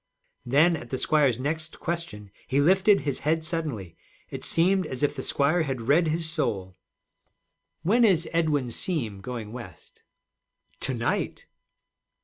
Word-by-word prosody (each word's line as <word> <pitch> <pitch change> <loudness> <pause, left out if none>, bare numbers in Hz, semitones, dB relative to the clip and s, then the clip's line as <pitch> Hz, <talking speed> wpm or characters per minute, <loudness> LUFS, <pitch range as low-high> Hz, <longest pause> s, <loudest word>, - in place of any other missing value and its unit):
Then, 155 +7 +4
at 120 -6 -8
the 130 - -2
squire's 140 -4 +2
next 155 +4 -4
question, 110 - -5 0.2
he 135 - +1
lifted 190 +6 +4
his 140 -2 -2
head 160 +2 0
suddenly. 150 - -4 0.4
It - - -6
seemed 185 +1 +3
as 130 0 -5
if 145 - +1
the 135 - -4
squire 145 +6 +2
had 135 -5 -2
read 160 +4 +4
his 160 +1 -1
soul. 105 - -2 1.1
'When 230 +8 +3
is 180 -7 +3
Edwin 150 -7 +1
Seem 115 - -2
going 115 -1 -6
West?' 120 -2 -11 0.8
'To 130 - -2
night.' 115 0 -2
150 Hz, 140 wpm, -26 LUFS, 125-165 Hz, 1.1 s, Then